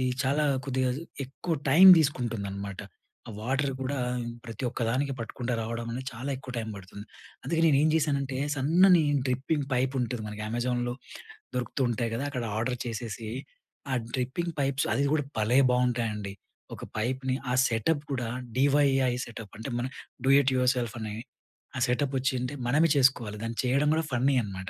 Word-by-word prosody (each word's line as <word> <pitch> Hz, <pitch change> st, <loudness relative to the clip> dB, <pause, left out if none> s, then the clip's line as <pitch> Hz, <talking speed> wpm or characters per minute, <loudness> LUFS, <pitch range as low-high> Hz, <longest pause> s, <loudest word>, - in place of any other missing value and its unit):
ఇది 130 Hz, -, +1 dB, 0.2 s
చాలా 145 Hz, +3 st, +2 dB, 0.2 s
కొద్దిగా 130 Hz, -1 st, +1 dB, 0.3 s
ఎక్కువ 160 Hz, +5 st, -3 dB, 0.2 s
టైం 180 Hz, +7 st, +8 dB
తీసుకుంటుందనమాట. 100 Hz, -9 st, -2 dB, 0.5 s
ఆ -, -, -5 dB
వాటర్ 135 Hz, +4 st, 0 dB
కూడా 135 Hz, +1 st, -2 dB, 0.5 s
ప్రతి 115 Hz, +1 st, -7 dB
ఒక్క 120 Hz, -, -4 dB
దానికి 135 Hz, +3 st, 0 dB
పట్టకుండా 120 Hz, +2 st, -4 dB
రావడం 115 Hz, +1 st, -4 dB
అనేది 125 Hz, +3 st, -4 dB
చాలా 130 Hz, +5 st, -5 dB
ఎక్కువ 130 Hz, -1 st, -9 dB
టైం 110 Hz, -1 st, -4 dB
బడుతుంది. 100 Hz, +1 st, -10 dB, 0.4 s
అందుకే 165 Hz, +5 st, 0 dB
నేను 150 Hz, -4 st, +5 dB
ఏం 155 Hz, -, +4 dB
జేసానంటే, 140 Hz, -4 st, 0 dB, 0.2 s
సన్నని 170 Hz, +5 st, +5 dB, 0.2 s
డ్రిప్పింగ్ 135 Hz, +3 st, -1 dB
పైప్ 130 Hz, +2 st, +1 dB
ఉంటది 120 Hz, -1 st, -2 dB
మనకి 105 Hz, 0 st, -6 dB
అమెజాన్‌లో 120 Hz, +1 st, -1 dB, 0.6 s
దొరుకుతూ 125 Hz, +2 st, -2 dB
ఉంటాయి 115 Hz, 0 st, -1 dB
గదా! 130 Hz, -, -2 dB
అక్కడ 125 Hz, -3 st, -3 dB
ఆర్డర్ 125 Hz, +3 st, -1 dB
చేసేసి. 115 Hz, -1 st, -5 dB, 0.6 s
ఆ -, -, +1 dB, 0.2 s
డ్రిప్పింగ్ 135 Hz, +7 st, -2 dB
పైప్స్ 135 Hz, -1 st, +1 dB
అది 115 Hz, +5 st, +1 dB
కూడా 150 Hz, -2 st, +2 dB
భలే 110 Hz, +4 st, +2 dB
బాగుంటాయండి. 115 Hz, -5 st, 0 dB, 0.4 s
ఒక -, -, -8 dB
పైప్ని 130 Hz, +4 st, -1 dB, 0.2 s
ఆ -, -, +1 dB
సెటప్ 135 Hz, +6 st, 0 dB
కూడా 125 Hz, -3 st, -1 dB, 0.3 s
డీవైఐ 135 Hz, -1 st, +3 dB
సెటప్ 115 Hz, -4 st, -9 dB
అంటే 115 Hz, +5 st, -6 dB
మన 120 Hz, -, -1 dB, 0.4 s
డూ 135 Hz, -, +3 dB
ఇట్ 135 Hz, -1 st, +3 dB
యుర్సెల్ఫ్ 125 Hz, -2 st, +1 dB
అని. 110 Hz, -1 st, -4 dB, 0.7 s
ఆ -, -, -1 dB
సెటప్ 135 Hz, +3 st, 0 dB
వచ్చింటే, 130 Hz, 0 st, -1 dB
మనమే 150 Hz, +6 st, +4 dB
చేసుకోవాలి. 125 Hz, -6 st, +2 dB
దాన్ని 115 Hz, 0 st, -4 dB
చేయడం 140 Hz, +4 st, +2 dB
గూడా 160 Hz, -, +1 dB
ఫన్నీ 130 Hz, +3 st, +2 dB
అనమాట. 95 Hz, -2 st, -6 dB
125 Hz, 160 wpm, -28 LUFS, 115-140 Hz, 0.7 s, టైం